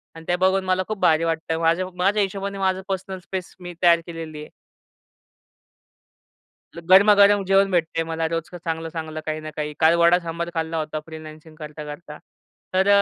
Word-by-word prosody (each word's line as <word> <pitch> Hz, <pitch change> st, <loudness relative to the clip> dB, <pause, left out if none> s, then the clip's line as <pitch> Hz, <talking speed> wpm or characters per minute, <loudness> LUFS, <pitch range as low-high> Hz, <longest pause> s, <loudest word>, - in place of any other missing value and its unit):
आणि 165 Hz, 0 st, -11 dB
ते 175 Hz, -, +2 dB
बघून 190 Hz, +1 st, +2 dB
मला 185 Hz, 0 st, +1 dB
खूप 215 Hz, -2 st, -4 dB
भारी 160 Hz, 0 st, +3 dB
वाटतंय 160 Hz, 0 st, -1 dB
माझ्या 165 Hz, +3 st, +1 dB
माझ्या 200 Hz, +4 st, +2 dB
हिशोबाने, 195 Hz, +1 st, -4 dB
माझं 190 Hz, -1 st, 0 dB
पर्सनल 190 Hz, 0 st, -4 dB
स्पेस 185 Hz, 0 st, -7 dB
मी 175 Hz, -1 st, -8 dB
तयार 170 Hz, -1 st, +6 dB
केलेली 165 Hz, -2 st, -7 dB
आहे. -, -, -11 dB, 2.3 s
गरमा, 190 Hz, +5 st, +6 dB
गरम 200 Hz, 0 st, +5 dB
जेवण 195 Hz, 0 st, +3 dB
भेटतंय 165 Hz, -1 st, 0 dB
मला 165 Hz, 0 st, -2 dB
रोज 165 Hz, 0 st, -2 dB
चांगलं-चांगलं 160 Hz, -2 st, -5 dB
काही 155 Hz, 0 st, -3 dB
ना 155 Hz, -, -7 dB
काही. 150 Hz, -1 st, -4 dB
काल 160 Hz, +1 st, +5 dB
वडा 170 Hz, +1 st, +5 dB
सांबार 170 Hz, 0 st, -5 dB
खाल्ला 165 Hz, 0 st, -2 dB
होता 155 Hz, 0 st, -3 dB
फ्रीलान्सिंग 155 Hz, 0 st, -11 dB
करता-करता. 150 Hz, 0 st, -9 dB, 0.6 s
तर 190 Hz, +1 st, +2 dB
170 Hz, 160 wpm, -23 LUFS, 160-185 Hz, 2.3 s, तयार